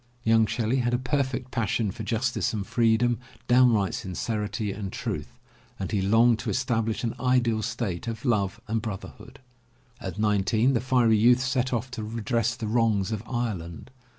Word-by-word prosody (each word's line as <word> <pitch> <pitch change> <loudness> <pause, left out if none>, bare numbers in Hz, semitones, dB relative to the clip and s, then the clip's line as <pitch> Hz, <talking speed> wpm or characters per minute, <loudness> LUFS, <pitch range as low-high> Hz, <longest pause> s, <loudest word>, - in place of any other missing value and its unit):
Young 115 -1 +4
Shelley 115 +3 0
had 120 -1 +1
a - - +2
perfect 130 0 -2
passion 110 -2 0
for 110 - -8
justice 115 +1 -1
and 100 -3 -3
freedom, 115 +1 +2 0.3
down 125 0 +6
right 100 -5 +1
sincerity 105 +3 -3
and 100 -1 -5
truth, 75 -3 -5 0.4
and 95 - -4
he 100 -3 +1
longed 115 +4 +4
to - - -4
establish 115 -4 -1
an 115 - -1
ideal 120 -3 +2
state 100 -4 -3
of 115 +2 -5
love 110 -3 +1
and 110 +1 -1
brotherhood. 110 +5 -8 0.6
At 95 - -6
nineteen 105 +4 +2
the 115 - +1
fiery 120 -3 +3
youth 125 +3 +5
set 130 0 0
off 125 +1 -2
to 115 -3 -5
redress 115 +1 -1
the 115 - -5
wrongs 110 -3 +1
of 110 -2 -2
Ireland. 110 -6 -4
115 Hz, 170 wpm, -26 LUFS, 105-120 Hz, 0.6 s, down